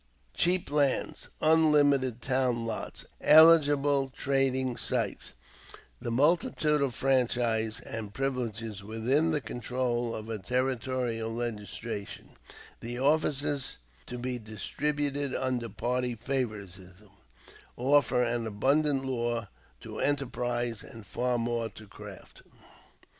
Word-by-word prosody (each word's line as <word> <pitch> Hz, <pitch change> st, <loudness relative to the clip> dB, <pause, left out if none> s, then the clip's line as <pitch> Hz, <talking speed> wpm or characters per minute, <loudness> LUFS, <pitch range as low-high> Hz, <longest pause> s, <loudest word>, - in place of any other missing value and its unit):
Cheap 175 Hz, -3 st, +1 dB
lands, 145 Hz, -2 st, 0 dB
unlimited 145 Hz, -6 st, +3 dB
town 125 Hz, -3 st, +1 dB
lots, 115 Hz, -1 st, -5 dB, 0.2 s
eligible 145 Hz, -4 st, +6 dB
trading 130 Hz, -2 st, 0 dB
sites, -, -, -1 dB, 0.7 s
the -, -, -4 dB
multitude 150 Hz, +2 st, +2 dB
of 135 Hz, -4 st, 0 dB
franchises 120 Hz, -4 st, +1 dB
and 110 Hz, -4 st, -6 dB
privileges 115 Hz, -5 st, -3 dB
within 120 Hz, +9 st, +1 dB
the 155 Hz, -2 st, +1 dB
control 120 Hz, -1 st, -2 dB
of 110 Hz, 0 st, -7 dB
a 110 Hz, -2 st, -4 dB
territorial 125 Hz, 0 st, -1 dB
legislature, 115 Hz, -2 st, -5 dB, 0.6 s
the 120 Hz, +1 st, -5 dB
offices 145 Hz, -1 st, +1 dB, 0.3 s
to 125 Hz, -, -6 dB
be 125 Hz, 0 st, -3 dB
distributed 140 Hz, +5 st, -2 dB
under 125 Hz, -3 st, -1 dB
party 125 Hz, +3 st, -1 dB
favoritism, 105 Hz, -6 st, -5 dB, 0.7 s
offer 135 Hz, -1 st, +3 dB
an 120 Hz, -1 st, -1 dB
abundant 135 Hz, +6 st, +1 dB
lure 120 Hz, -4 st, -2 dB, 0.3 s
to -, -, -8 dB
enterprise 120 Hz, -5 st, -1 dB
and 115 Hz, -2 st, -11 dB
far 125 Hz, +5 st, -1 dB
more 115 Hz, -1 st, -1 dB
to 110 Hz, +2 st, -13 dB
craft. 100 Hz, -, -12 dB
125 Hz, 105 wpm, -29 LUFS, 115-140 Hz, 0.7 s, eligible